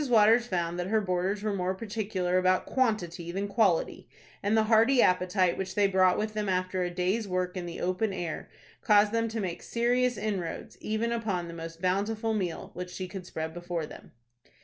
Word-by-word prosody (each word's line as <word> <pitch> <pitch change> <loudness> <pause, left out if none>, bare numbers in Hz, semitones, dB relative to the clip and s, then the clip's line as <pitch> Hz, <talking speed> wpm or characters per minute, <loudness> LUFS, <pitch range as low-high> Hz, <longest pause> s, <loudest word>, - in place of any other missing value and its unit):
Waters 230 +1 +5
found 175 -3 -1
that 180 - -2
her 220 +2 +2
boarders 190 +1 -1
were 215 -1 0
more 185 -1 -1
particular 195 -4 -1
about 185 0 +2
quantity 180 -9 -1
than 195 +3 -2
quality, 200 -5 +1 0.3
and 205 +2 +2
the 220 - +5
hearty 225 +4 +4
appetite 185 -2 +3
which 190 - -4
they 205 - +4
brought 185 -2 +4
with 215 0 -2
them 210 -2 -2
after 185 0 0
a 180 - 0
day's 185 +5 -1
work 180 0 -1
in 180 -2 -4
the 170 - -6
open 185 +4 0
air 175 -4 -4 0.3
caused 210 -1 +5
them 230 0 +1
to 225 0 -4
make 180 -4 -3
serious 245 +1 +1
inroads 200 -5 -4
even 220 +2 -1
upon 205 -7 -1
the 170 - -7
most 165 +1 -8
bountiful 210 +4 0
meal 185 -6 -3
which 180 +1 -6
she 185 +1 -5
could 185 -1 -8
spread 160 -1 -4
before 175 -1 -3
them. - - -12
190 Hz, 195 wpm, -29 LUFS, 180-215 Hz, 0.3 s, Waters